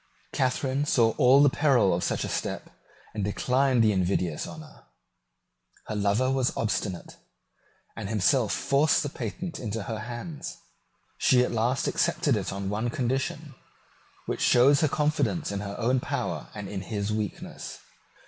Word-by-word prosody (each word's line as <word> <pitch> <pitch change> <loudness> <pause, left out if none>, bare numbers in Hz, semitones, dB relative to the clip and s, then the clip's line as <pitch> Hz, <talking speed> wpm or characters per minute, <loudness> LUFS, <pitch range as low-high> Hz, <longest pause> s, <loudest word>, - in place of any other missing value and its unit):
Catharine 135 +2 0
saw 115 -5 +4
all 135 +3 +6
the 145 - +6
peril 130 - +3
of 85 - -1
such - - -1
a - - -2
step, - - -4 0.4
and 105 - -3
declined 125 +4 +2
the 110 - +4
invidious 90 -4 0
honour. 155 -1 -12 1.0
Her 110 - -4
lover 105 +6 +1
was 130 -2 0
obstinate, 100 -5 -2 0.8
and 105 -3 -5
himself 110 +2 +2
forced 140 +3 +2
the 145 - -3
patent 165 - -5
into 110 -2 -4
her 110 +2 -4
hands. 120 +7 -6 0.6
She 125 -1 +4
at - - -1
last 120 +3 0
accepted - - +1
it - - -2
on 100 0 -4
one 110 +4 -1
condition, 130 +2 -2 0.7
which - - -3
shows 135 +4 +5
her 155 - +4
confidence 150 +1 0
in 100 - -3
her 100 0 -5
own 125 +2 +1
power - - -3
and 105 -2 -6
in 95 -1 -5
his 100 +1 -3
weakness. 105 -2 -5
120 Hz, 150 wpm, -27 LUFS, 105-135 Hz, 1.0 s, all